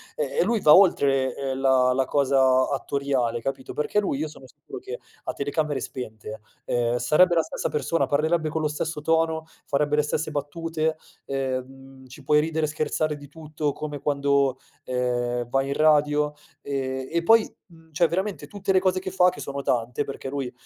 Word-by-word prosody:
e 145 +2 0
lui 225 +4 +1
va 150 - +7
oltre, 135 -9 +4
ehm, 135 -1 -3
la 130 -1 +4
la 130 +1 +1
cosa 130 -2 +3
attoriale, 135 -4 -1
capito; 130 +2 -5
perché 150 +7 0
lui, 195 -9 -1
io 155 +2 -2
sono 150 -3 -13
sicuro, - - -11
che - - -7 0.3
a - - -2
telecamere 145 0 -1
spente, 110 -4 -7 0.2
ehm, 120 0 0
sarebbe 150 +9 +4
la 165 - +3
stessa - - -3
persona, 165 +2 0
parlerebbe 155 +2 +1
con 160 +1 -2
lo 155 - +1
stesso 150 +1 -3
tono, 160 0 +1 0.2
farebbe 145 +1 +1
le 150 - +4
stesse 150 +1 -2
battute, 160 +2 -2 0.3
ehm, 135 0 -5
ci 130 +3 -13
puoi 150 +2 +4
ridere 160 0 -1
e - - -3
scherzare 155 0 -1
di 145 0 -12
tutto 150 -1 -4
come 150 -1 -6
quando, 140 -2 +1 0.3
ehm, 120 -1 -1
vai 135 +2 +1
in 140 - -1
radio 150 -1 +3 0.3
e 130 -1 -3
e 170 +1 +1
poi, 225 +4 +5 0.2
mhmm, 165 -2 -20
cioè 170 +2 +3
veramente 190 +4 -3
tutte 200 -1 -3
le 190 - +5
cose 185 0 +1
che 185 0 -6
fa, 180 -1 +4
che 180 - -9
sono 140 0 -4
tante, 125 +1 0
perché 135 -1 -6
lui 135 -2 -3
145 Hz, 185 wpm, -25 LUFS, 130-160 Hz, 0.3 s, va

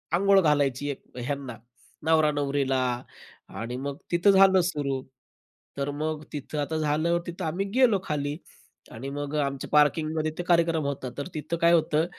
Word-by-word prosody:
अंघोळ 195 +1 +5
घालायची 145 -3 +1
एक 135 - -8 0.2
ह्यांना 135 0 -4 0.5
नवरा-नवरीला 145 -4 +2 0.7
आणि 115 +2 -5
मग 140 +1 -4
तिथं 175 +4 +4
झालं 190 -1 +6
सुरू. 140 -3 -2 0.8
तर 140 +1 -1
मग 155 -1 -2
तिथं 150 +1 -5
आता 160 +2 -2
झालं, 155 +3 +1
तिथं 175 0 -5
आम्ही 180 +5 -1
गेलो 230 -6 +5
खाली 145 -1 -2 0.5
आणि 130 +5 -6
मग 145 +1 -4
अ, - - +1
आमच्या 140 -1 -5
पार्किंगमध्ये 155 +1 +2
ते 175 - -3
कार्यक्रम 165 -3 +2
होता. 135 -2 -3
तर 140 - -4
तिथं 160 +2 -3
काय 170 +1 +4
होतं 160 -1 +3
150 Hz, 155 wpm, -26 LUFS, 140-165 Hz, 0.8 s, झालं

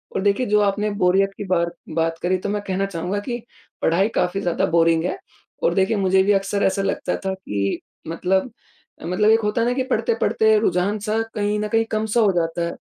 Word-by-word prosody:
और - - 0
देखिए 205 +5 +1
जो 210 0 +3
आपने 205 +1 +1
बोरियत 195 +2 +3
की - - -4
बार 170 -2 +1 0.2
बात 165 0 0
करी 185 +1 +1
तो 200 - -3
मैं 205 0 -1
कहना 190 +1 0
चाहूँगा 190 +1 -3
कि 240 -2 -2 0.4
पढ़ाई 180 +5 +2
काफ़ी 195 +2 0
ज़्यादा 175 -3 0
बोरिंग 165 -1 +3
है 375 - -2 0.5
और - - +3
देखिए 195 +3 +1
मुझे 190 -1 +3
भी 205 - +2
अक्सर 195 +1 0
ऐसा 195 +1 +1
लगता 195 - -1
था 190 - 0
कि 100 - -3 0.3
मतलब, 190 +7 0 0.5
मतलब 185 +5 +2
एक 225 - +5
होता 210 +2 0
है 235 - +1
ना 245 - +1
कि 260 - 0
पढ़ते-पढ़ते 220 - +2
रुझान-सा 210 +3 0
कहीं 210 0 0
न 210 - -1
कहीं 225 +1 +1
कम-सा 220 +1 +1
हो 205 -3 +4
जाता 170 0 0
है। - - -5
195 Hz, 205 wpm, -22 LUFS, 180-210 Hz, 0.5 s, एक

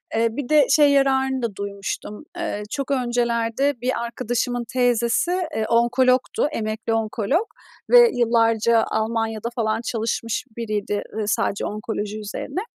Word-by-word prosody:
Eee, 230 +1 +3
bir 245 +1 -5
de 300 -3 +5
şey 295 -2 +5
yararını 265 -1 +2
da 230 -4 -3
duymuştum. 200 +3 -5
Iıı, 320 -12 -3
çok 275 +3 -3
öncelerde 240 0 0
bir 250 -1 -1
arkadaşımın 245 0 -2
teyzesi, 245 +5 +2 0.2
ııı, 220 - 0
onkologdu, 255 +3 +2
emekli 220 -2 -2
onkolog 225 - 0 0.4
ve 485 -1 +8
yillarca 230 -1 +3
Almanya'da 225 0 -1
falan 220 -1 0
çalışmış 230 0 -2
biriydi, 210 -3 -2
ııı, 215 -1 -2
sadece 200 -1 0
onkoloji 210 0 -4
üzerine. 215 - -5
235 Hz, 125 wpm, -22 LUFS, 220-255 Hz, 0.4 s, ve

